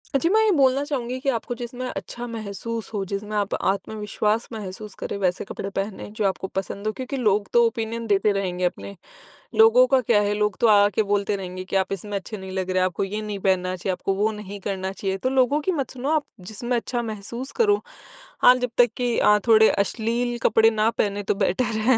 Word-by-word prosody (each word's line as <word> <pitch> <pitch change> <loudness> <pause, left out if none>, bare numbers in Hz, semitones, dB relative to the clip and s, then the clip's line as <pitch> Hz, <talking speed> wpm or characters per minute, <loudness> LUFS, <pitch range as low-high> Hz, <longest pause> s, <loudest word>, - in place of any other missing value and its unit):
अ, - - +7
जी, 330 +5 +1
मैं 435 +3 +4
ये 435 - +4
बोलना 275 -4 +3
चाहूँगी 255 -4 -3
कि 275 +1 -1
आपको 240 -1 -2
जिसमें 245 +1 -6
अच्छा 240 0 -6
महसूस 225 0 -5
हो, 205 -2 -1
जिसमें 210 +2 -4
आप 200 -1 -1
आत्मविश्वास 210 +2 -1
महसूस 210 -1 -7
करें - - -3
वैसे 185 -1 0
कपड़े 195 - -4
पहनें 195 +1 -4
जो 215 -1 -1
आपको 190 0 -3
पसंद 195 +2 -3
हों। 215 - 0
क्योंकि 260 +3 -5
लोग 210 -4 +1
तो 235 - +6
ओपिनियन 230 0 -2
देते 205 0 +3
रहेंगे 180 -2 -1
अपने। 190 +2 -4 0.6
लोगों 455 +3 +7
का 265 - +4
क्या 210 -3 +3
है 205 0 +1
लोग 210 -2 0
तो 235 - +5
आ-आ 205 -1 +6
के 220 - +3
बोलते 205 0 0
रहेंगे 185 -1 -6
कि 190 - -5
आप 190 0 +1
इसमें 200 +2 -4
अच्छे 210 +3 -7
नहीं 190 -1 -8
लग 185 0 -3
रहे 185 - 0
हैं, 185 - +3
आपको 185 +1 -2
ये 205 +2 -3
नहीं 210 -2 -5
पहनना 185 -1 +1
चाहिए, 185 +1 -2
आपको 195 +2 -2
वो 210 +3 +1
नहीं 205 -1 -8
करना 190 -1 -2
चाहिए। 195 0 -3
तो 255 - -1
लोगों 265 +3 +2
की 375 - 0
मत 265 - -3
सुनो 260 +2 -4
आप 305 - +1 0.3
जिसमें 240 +3 -2
अच्छा 240 +1 -2
महसूस 230 +4 -6
करो 415 -2 +3 0.6
हाँ, 250 - +9
जब 250 0 -2
तक 245 -1 +6
कि 245 -2 0
अ, 210 - +5
थोड़े 220 -1 +7
अश्लील 235 +4 -1
कपड़े 225 0 +5
ना 220 0 +2
पहनें 205 -2 -1
तो - - +1
बेटर 195 +3 +1 0.3
है। 255 - +6
215 Hz, 225 wpm, -24 LUFS, 195-240 Hz, 0.6 s, हाँ